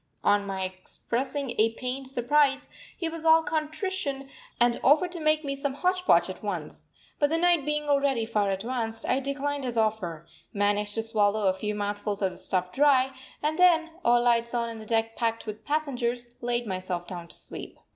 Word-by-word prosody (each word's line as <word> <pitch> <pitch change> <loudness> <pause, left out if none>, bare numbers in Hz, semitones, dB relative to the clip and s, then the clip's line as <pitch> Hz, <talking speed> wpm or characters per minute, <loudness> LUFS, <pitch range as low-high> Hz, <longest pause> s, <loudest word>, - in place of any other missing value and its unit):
On 205 0 +3
my 190 -1 -2
expressing 240 +8 -3
a 225 +1 +4
pained 255 +2 -4
surprise, 275 +2 +2 0.3
he 335 - -2
was 325 0 -5
all 325 0 +6
contrition 310 -3 -2 0.3
and 240 0 +3
offered 315 +6 +4
to 345 - -6
make 310 0 +2
me 275 0 -2
some 275 -1 -2
hotch 365 +3 0
potch - - +5
at - - -7
once. - - -5 0.3
But 290 - +3
the 325 - +1
night 345 -4 +3
being 300 0 0
already 280 -5 +2
far 210 -3 0
advanced, 225 +3 -2
I 265 - +2
declined 280 +1 -2
his 245 -2 -3
offer, 200 -8 -1 0.3
managed 205 0 +1
to 225 - -1
swallow 215 -2 +1
a 190 - +4
few 210 +2 -3
mouthfuls 205 0 -2
of 190 - +2
the - - -10
stuff 180 -1 -1
dry, 265 +1 +4 0.3
and 310 +2 0
then, 330 -2 +5
all 240 0 +4
lights 235 0 +2
on 235 -1 0
and 225 -1 -7
the 215 - -11
deck 225 0 0
packed 230 -1 -1
with 215 -1 -7
passengers, 245 -5 -1
laid 240 0 -1
myself 185 -3 -3
down 175 -2 -7
to - - -10
sleep. - - -7
240 Hz, 190 wpm, -27 LUFS, 210-290 Hz, 0.3 s, all